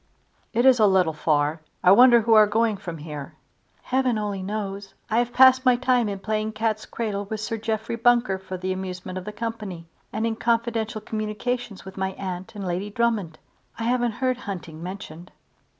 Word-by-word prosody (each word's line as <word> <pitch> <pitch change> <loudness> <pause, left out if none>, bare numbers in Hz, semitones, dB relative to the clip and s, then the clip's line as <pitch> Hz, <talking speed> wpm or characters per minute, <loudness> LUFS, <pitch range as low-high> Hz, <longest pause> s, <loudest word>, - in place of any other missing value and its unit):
"It 240 +2 +1
is 260 -2 +6
a 215 - +6
little 185 -4 +3
far. 150 0 0 0.2
I 180 - +7
wonder 240 +3 +8
who 225 +1 +3
are 215 -1 +7
going 220 +1 +1
from 175 -4 -7
here?" 150 -2 -8 0.5
"Heaven 255 -3 +1
only 205 -2 -3
knows. 200 0 -5 0.2
I 225 - +3
have 240 0 0
passed 260 +1 +6
my 255 -2 +5
time 245 -2 +2
in 200 - -3
playing 215 +2 -2
cat's 215 0 -1
cradle 205 -3 -3
with 215 +2 -5
Sir 225 +2 -3
Jeffrey 220 +1 -2
Bunker 235 -4 +3
for 190 -1 -6
the 185 +1 -2
amusement 185 0 -5
of 185 - -11
the 210 - -5
company, 210 -6 -5 0.3
and 220 +1 -1
in 225 -1 -1
confidential 230 -1 0
communications 215 0 -4
with 190 0 -10
my 190 0 -2
aunt 185 +2 -6
and 200 -2 -5
Lady 180 +3 -2
Drummond. 210 -7 -1 0.4
I 225 - -4
haven't 240 -1 +1
heard 255 +1 0
hunting 175 -8 -7
mentioned." 180 -2 -8
215 Hz, 185 wpm, -24 LUFS, 190-230 Hz, 0.5 s, wonder